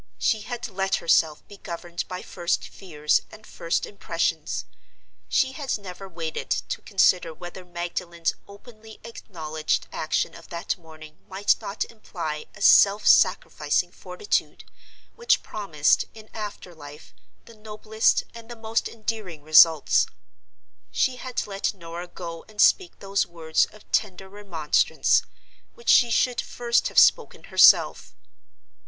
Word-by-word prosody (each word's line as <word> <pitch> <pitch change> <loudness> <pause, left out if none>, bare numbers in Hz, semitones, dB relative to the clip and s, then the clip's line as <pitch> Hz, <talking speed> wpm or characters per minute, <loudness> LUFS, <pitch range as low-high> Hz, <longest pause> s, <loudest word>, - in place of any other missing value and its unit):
She 220 - +1
had 245 +3 -5
let 195 -2 -1
herself 160 -2 +1
be 205 - -13
governed 170 -1 -6
by 180 0 -6
first 175 -1 -2
fears 150 -6 -1
and 215 0 -14
first 165 - -2
impressions; 165 -5 -3 0.6
she 265 - +2
had 265 -2 -3
never 195 -1 -10
waited 165 -2 -5
to - - -2
consider 180 -4 +2
whether 180 +2 -9
Magdalen's 175 -1 -3
openly 215 +1 -14
acknowledged 160 -9 -4
action 155 - -1
of 170 - -14
that 170 0 -3
morning 155 -2 -15
might 195 +2 +2
not 200 - -3
imply 170 -9 -6
a 200 - -7
self 205 +1 +6
sacrificing - - +3
fortitude, 425 - -3 0.5
which 470 -1 +2
promised, 160 -8 +1
in 220 -1 -14
after 205 -4 -7
life, 145 -1 -13 0.3
the 230 - -14
noblest 215 0 0
and 230 0 -12
the 240 - -7
most 225 0 -2
enduring 215 -8 -6
results. 155 0 +5 0.8
She 255 -1 0
had 255 -1 -4
let 200 0 -3
Norah 170 0 -8
go 170 -2 -8
and 215 -1 -17
speak 370 - +3
those 195 0 -1
words 160 -2 0
of 215 - -18
tender 190 -3 -1
remonstrance, 190 -7 +1 0.5
which 475 - -6
she 240 - +6
should 245 +1 +1
first 240 -1 0
have - - -9
spoken - - +4
herself. - - +5
190 Hz, 135 wpm, -24 LUFS, 165-220 Hz, 0.8 s, self